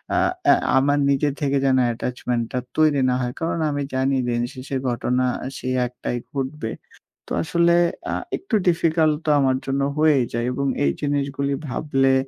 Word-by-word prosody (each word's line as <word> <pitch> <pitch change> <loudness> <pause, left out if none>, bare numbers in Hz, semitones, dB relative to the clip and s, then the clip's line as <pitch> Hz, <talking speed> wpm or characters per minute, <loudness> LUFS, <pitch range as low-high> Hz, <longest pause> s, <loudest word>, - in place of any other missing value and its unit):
আ - - +2 0.3
এ্যা - - +8 0.2
আমার 145 +2 +3
নিজের 140 +1 +2
থেকে 140 -1 +1
যেন 130 -1 +3 0.2
attachment 120 0 -2
টা 125 - -1 0.2
তৈরি 155 -3 +4
না 125 - +2
হয়। 125 -1 -2
কারণ 165 0 -1
আমি 145 -1 -2
জানি 135 +1 +1
দিনশেষের 125 +3 -3
ঘটনা 125 +1 0 0.3
সেই 130 0 -2
একটাই 120 0 -4
ঘটবে। 135 -4 -3 0.6
তো, - - -15
আসলে 170 +2 +3 0.4
আ - - -1 0.2
একটু 375 - -3
ডিফিকাল্ট 160 -2 +3
তো - - 0
আমার 130 -2 +2
জন্য 135 +1 -1 0.2
হয়েই 150 -4 +4
যায়। 120 0 -1
এবং 140 +2 -1 0.2
এই 70 - +3
জিনিসগুলি 140 -1 -1 0.2
ভাবলে 135 -1 +1
135 Hz, 160 wpm, -22 LUFS, 125-150 Hz, 0.6 s, এ্যা